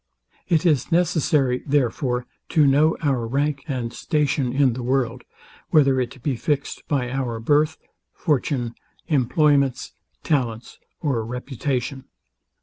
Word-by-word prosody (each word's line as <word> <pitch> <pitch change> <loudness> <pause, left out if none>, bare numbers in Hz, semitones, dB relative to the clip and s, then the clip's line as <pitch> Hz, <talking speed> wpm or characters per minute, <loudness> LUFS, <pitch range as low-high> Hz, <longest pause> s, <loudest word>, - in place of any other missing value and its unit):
It 165 -1 +2
is 155 -1 +2
necessary, 150 -6 +2
therefore, 125 -2 0 0.2
to 155 -2 +4
know 145 +4 +4
our 130 -6 +1
rank 140 +3 -1
and 125 -5 -3
station 145 -4 0
in 135 -1 +3
the 125 - -5
world, 125 -1 -1 0.5
whether 135 -4 +4
it 125 0 -6
be 140 -4 0
fixed 140 +4 -2
by 125 -4 -1
our 125 -4 -2
birth, 150 +6 +2 0.3
fortune, 130 -6 -1 0.3
employments, 140 -1 +2 0.3
talents 120 -6 -2 0.2
or 135 -8 0
reputation. 130 +2 -3
135 Hz, 120 wpm, -23 LUFS, 125-150 Hz, 0.5 s, to